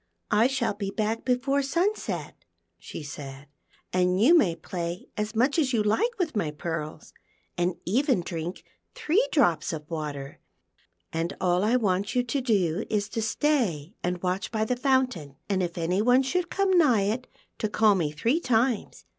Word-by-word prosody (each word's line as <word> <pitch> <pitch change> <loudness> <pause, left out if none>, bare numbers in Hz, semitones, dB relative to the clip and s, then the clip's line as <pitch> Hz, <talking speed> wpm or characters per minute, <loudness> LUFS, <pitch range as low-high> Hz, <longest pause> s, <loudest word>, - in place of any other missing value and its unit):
" - - -52
I 220 +3 +5
shall 260 -5 0
be 200 -1 -4
back 220 +2 -2
before 265 +2 +1
sunset," 345 +10 -2 0.4
she - - -8
said, 140 -1 -8 0.3
" - - -35
and 180 0 +2
you 275 +11 +6
can 190 - +4
play 170 +1 -5
as 210 +1 -3
much 265 +8 +2
as 270 -4 +1
you 220 -3 +2
like 450 - +1
with 340 - -1
my 200 -7 0
pearls, 155 0 -5 0.4
and 175 0 0
even 250 - +2
drink 170 0 -5 0.3
three 365 +10 +2
drops 175 - +2
of 150 -2 -6
water, 145 -4 -5 0.7
and 165 +2 -2
all 180 0 +2
I 225 +4 +3
want 200 -3 0
you 250 - +3
to 255 +3 -2
do 200 -6 +1
is 205 -1 -1
to 225 - -3
stay 220 - 0
and 180 0 -2
watch 185 +2 -1
by 220 -1 0
the 250 - 0
fountain, 255 - 0
and 195 -2 0
if 175 -1 -3
any 175 +4 0
one 250 +4 +4
should 345 +6 -1
come 395 -1 +1
nigh 245 -11 +4
it 225 +6 -2 0.3
to 215 - -1
call 215 0 +4
me 165 -6 0
three 230 - +1
times. 240 -5 0
210 Hz, 180 wpm, -27 LUFS, 175-255 Hz, 0.7 s, you